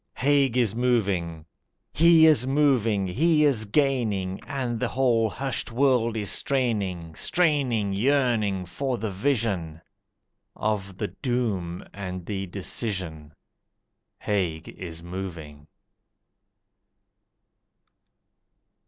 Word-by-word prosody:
Haig 135 -2 +2
is 120 -5 +2
moving! 100 -10 0 0.5
He 165 0 +6
is 145 -6 +4
moving, 130 -8 +2
he 150 - +2
is 120 -7 +2
gaining, 105 -7 0
And 130 -5 -3
the - - 0
whole 120 -4 +2
hushed 130 +5 -3
world 120 -3 +2
is 105 -2 0
straining, 100 -11 -1
Straining, 130 - +1
yearning, 110 -5 +1
for 130 +7 -3
the 110 -1 -3
vision 95 - -1 0.8
Of 100 -3 -2
the 105 - -3
doom 105 -10 -2
and 90 -3 -6
the 95 -1 -4
decision 90 -5 -3 0.8
Haig 90 -6 -2
is 85 -2 -8
moving! 85 -5 -7
110 Hz, 95 wpm, -25 LUFS, 95-130 Hz, 0.8 s, He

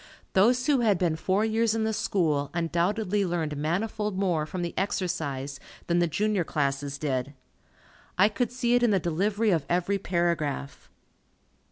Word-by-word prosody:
Those 245 +6 +4
who 285 -2 +3
had 215 -5 +3
been 170 -3 +1
four 190 +6 +1
years 225 0 +1
in 225 - 0
the 220 0 0
School, 155 -9 0
undoubtedly 185 +5 0
learned 170 -5 -2
manifold 200 +7 -2
more 175 -6 0
from 175 +3 -4
the 170 - -3
exercise 145 -8 -2 0.3
than 175 0 +1
the 175 - +3
junior 205 +3 0
classes 140 -2 -2
did. 140 -1 -2 0.8
I 190 +3 +6
could 220 +3 -1
see 245 -1 0
it 245 - +4
in 240 - +4
the 200 -2 +3
delivery 200 +6 0
of 165 -5 +1
every 180 +3 +1
paragraph. 170 -6 -2
180 Hz, 160 wpm, -27 LUFS, 155-210 Hz, 0.8 s, I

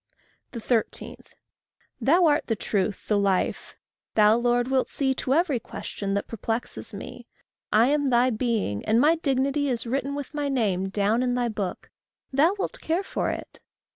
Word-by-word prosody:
13. 235 -1 -2 0.9
Thou 340 +5 +4
art 300 -1 +2
the 225 - +1
truth, 200 -1 -2
the 210 -1 +2
life. 195 -2 0 0.4
Thou, 215 0 +6
Lord, 240 +1 +1
wilt 265 -1 +1
see 265 -2 0
To 265 0 0
every 315 -6 +2
question 200 -2 -5
that 200 - -2
perplexes 225 +1 -4
me. - - -9 0.4
I 225 +4 +5
am 290 -1 +2
thy 245 +1 +3
being; 220 - -1
and 220 +2 +3
my 300 +5 +5
dignity 275 -1 0
Is 240 -2 -1
written 275 +3 -2
with 285 0 -6
my 290 -1 -1
name 195 -8 0
down 205 +4 +1
in 250 -1 0
thy 245 -1 0
book; 205 -4 -5 0.4
Thou 315 +8 +4
wilt - - -4
care 335 +5 0
for - - -2
it. - - -6
245 Hz, 165 wpm, -25 LUFS, 215-280 Hz, 0.9 s, Thou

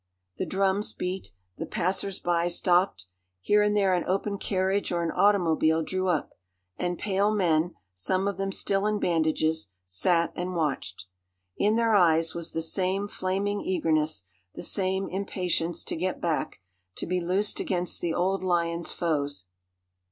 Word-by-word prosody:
The - - -2
drums 195 +1 0
beat. 185 +1 -4 0.3
The - - -3
passers 190 0 -1
by 175 0 +1
stopped. 175 - +2 0.3
Here 210 - +3
and 210 0 +2
there 195 -2 +3
an 180 - +1
open 200 +2 -1
carriage 190 +1 0
or 170 -1 0
an 165 - -1
automobile 165 -5 +3
drew 185 +3 -1
up, 170 -5 0 0.4
and 175 -1 -2
pale 200 0 +1
men, 175 -4 +2 0.2
some 185 - 0
of 200 -3 -2
them 195 0 -1
still 195 +1 0
in 210 0 +1
bandages, 160 - +1 0.2
sat 165 - +1
and 180 +1 -3
watched. 140 - -2 0.5
In 210 +2 +2
their 230 -1 +3
eyes 165 -4 +4
was 170 -1 -5
the 165 - -1
same 190 +4 0
flaming 200 +1 -1
eagerness, 155 - 0 0.3
the - - -6
same 190 0 0
impatience 180 -3 -2
to - - -3
get 180 +2 -2
back, 165 - -2 0.3
to - - -3
be 180 +1 -1
loosed 190 +4 +1
against 180 -2 -1
the 170 - 0
old 190 +2 +1
lion's 170 -2 0
foes. 145 - -1
180 Hz, 155 wpm, -27 LUFS, 165-195 Hz, 0.5 s, eyes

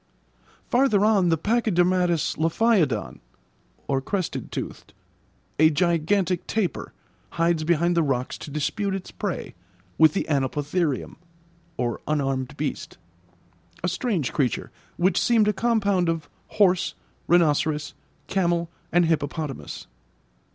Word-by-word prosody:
Farther 240 -5 +3
on, 200 -5 +3
the 165 - +3
pachydermatous 180 -5 +1
lophiodon 160 - +1 0.8
(crested 185 +1 -3
toothed), - - -7 0.6
a 155 0 +7
gigantic 175 +3 +1
tapir, 200 -9 -2 0.4
hides 165 -1 +1
behind 170 +2 +2
the 170 - +4
rocks 130 -4 -1
to - - -8
dispute 190 +7 -1
its 190 - -7
prey 200 -4 -4 0.5
with 155 -1 +6
the - - 0
anoplotherium 145 +2 -1 0.6
(unarmed 130 +1 -2
beast), - - -4 0.9
a - - +1
strange 180 - -1
creature, 130 -6 -1 0.3
which 185 +2 +2
seemed 225 -3 +3
a 210 - +3
compound 200 -5 +1
of 165 -2 -2 0.2
horse, 185 -4 +2 0.3
rhinoceros, 155 -3 +2 0.3
camel, 170 -1 0 0.2
and 175 0 +4
hippopotamus. 155 -3 -3
170 Hz, 105 wpm, -24 LUFS, 150-195 Hz, 0.9 s, a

